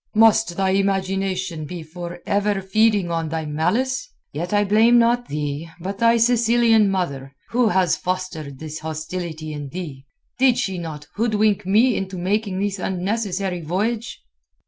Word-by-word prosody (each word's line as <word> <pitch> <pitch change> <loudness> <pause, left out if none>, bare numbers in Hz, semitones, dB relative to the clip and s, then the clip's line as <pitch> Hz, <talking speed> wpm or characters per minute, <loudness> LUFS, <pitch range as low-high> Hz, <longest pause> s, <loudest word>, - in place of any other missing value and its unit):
"Must 220 -4 +4
thy 190 -1 +2
imagination 190 -3 -1
be 170 +2 -7
for 175 +2 -8
ever 205 0 +1
feeding 200 -1 +2
on 165 -1 -1
thy 160 0 -3
malice? 215 - 0 0.2
Yet 170 +4 -4
I 205 0 +3
blame 220 +4 +5
not 240 +1 +3
thee, 150 +2 -4
but 195 +3 -5
thy 230 0 +4
Sicilian 230 -2 +4
mother, 140 -8 -3
who 240 0 +2
has 185 -3 +2
fostered 180 -6 -4
this 155 +1 -7
hostility 160 0 -5
in 145 -2 -6
thee. 145 -5 -7 0.3
Did 255 -2 +4
she 195 -7 -1
not 155 -3 -7
hoodwink 210 -3 +1
me 225 +6 +4
into 190 -1 -4
making 195 +1 -1
this 200 0 -1
unnecessary 190 -1 -2
voyage?" 210 - -2
190 Hz, 145 wpm, -22 LUFS, 165-215 Hz, 0.3 s, blame